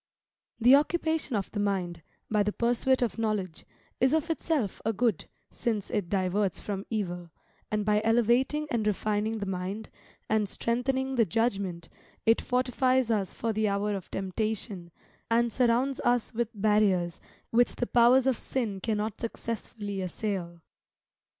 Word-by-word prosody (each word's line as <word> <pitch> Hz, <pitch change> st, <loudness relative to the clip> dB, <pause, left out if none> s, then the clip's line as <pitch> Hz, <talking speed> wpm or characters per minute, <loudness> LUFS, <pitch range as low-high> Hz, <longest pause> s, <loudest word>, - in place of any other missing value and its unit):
The 245 Hz, +3 st, +7 dB
occupation 315 Hz, -2 st, +2 dB
of 200 Hz, -2 st, -2 dB
the 210 Hz, -, -3 dB
mind, 185 Hz, -4 st, -1 dB, 0.3 s
by 210 Hz, -1 st, +2 dB
the 205 Hz, +1 st, +1 dB
pursuit 245 Hz, +3 st, +2 dB
of 235 Hz, -1 st, -2 dB
knowledge, 210 Hz, -6 st, -2 dB, 0.3 s
is 260 Hz, +3 st, +3 dB
of 320 Hz, +1 st, +1 dB
itself 305 Hz, -, -1 dB
a 225 Hz, -, 0 dB
good, 225 Hz, -3 st, 0 dB, 0.3 s
since 215 Hz, -4 st, -2 dB
it 200 Hz, -5 st, -1 dB
diverts 195 Hz, 0 st, 0 dB
from 195 Hz, -1 st, -5 dB
evil, 180 Hz, -6 st, -3 dB, 0.4 s
and 210 Hz, -1 st, -1 dB
by 210 Hz, 0 st, +3 dB
elevating 240 Hz, +6 st, +2 dB
and 220 Hz, -3 st, 0 dB
refining 215 Hz, +2 st, 0 dB
the 205 Hz, -, -3 dB
mind, 190 Hz, +3 st, -4 dB, 0.4 s
and 215 Hz, -2 st, +1 dB
strengthening 260 Hz, +4 st, -1 dB
the 230 Hz, -, +5 dB
judgment, 195 Hz, -4 st, -1 dB, 0.4 s
it 225 Hz, 0 st, +4 dB
fortifies 255 Hz, -1 st, +1 dB
us 200 Hz, -4 st, -1 dB
for 230 Hz, -1 st, -1 dB
the 215 Hz, 0 st, +1 dB
hour 205 Hz, +1 st, 0 dB
of 190 Hz, -, -7 dB
temptation, 195 Hz, -2 st, -3 dB, 0.4 s
and 230 Hz, 0 st, +2 dB
surrounds 250 Hz, +3 st, +2 dB
us 245 Hz, 0 st, +1 dB
with 235 Hz, -1 st, -1 dB
barriers 195 Hz, -5 st, +2 dB, 0.3 s
which 240 Hz, +1 st, +3 dB
the 245 Hz, -, -1 dB
powers 245 Hz, +2 st, +5 dB
of 265 Hz, -3 st, +2 dB
sin 225 Hz, -7 st, -2 dB
cannot 215 Hz, 0 st, -2 dB
successfully 215 Hz, -3 st, -4 dB
assail. 180 Hz, -2 st, -4 dB
220 Hz, 145 wpm, -28 LUFS, 200-240 Hz, 0.4 s, The